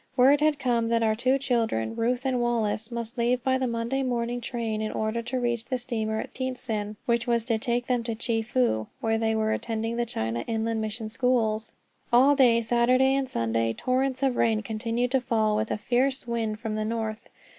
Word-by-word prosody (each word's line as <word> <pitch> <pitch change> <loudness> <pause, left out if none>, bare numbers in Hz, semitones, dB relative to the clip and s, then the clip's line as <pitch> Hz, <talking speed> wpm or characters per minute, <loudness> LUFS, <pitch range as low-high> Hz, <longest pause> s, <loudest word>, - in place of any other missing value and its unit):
Word 275 +4 +6
had 305 -1 +3
come 240 -4 +1
that 230 0 +2
our 220 -1 +3
two 255 +4 +2
children, 225 - -1
Ruth 245 +3 0
and 255 -2 +1
Wallace, 225 -2 0
must 235 0 -5
leave 245 +1 +1
by 260 0 +2
the 260 - 0
Monday 235 +3 -1
morning 245 -1 -1
train 225 -2 -3
in 215 - -2
order 220 +2 -1
to 255 +2 -3
reach 240 -2 -1
the 255 - -1
steamer 220 -3 -2
at - - -6
Tientsin, 230 -5 -3
which 235 0 +1
was 235 -1 +1
to 230 -3 0
take 240 +2 -1
them 250 -1 +1
to 230 -1 -2
Chefoo, 225 - 0
where 225 0 0
they 220 0 +1
were 220 0 +1
attending 225 0 -2
the 240 - +1
China 115 - -2
Inland 225 0 -1
Mission 220 +1 -4
schools. 220 -2 0 0.4
All 265 +4 +6
day 240 -4 +5
Saturday 245 +3 +3
and 270 -1 0
Sunday 115 0 0
torrents 260 - -1
of 265 -3 +1
rain 220 -2 +2
continued 230 +2 -2
to 265 -1 +2
fall, 220 -3 +1
with 215 +1 -1
a - - -1
fierce 255 +5 0
wind 225 -2 -2
from 220 -2 -4
the 215 0 -1
north. 220 0 -3
235 Hz, 200 wpm, -26 LUFS, 220-250 Hz, 0.4 s, Word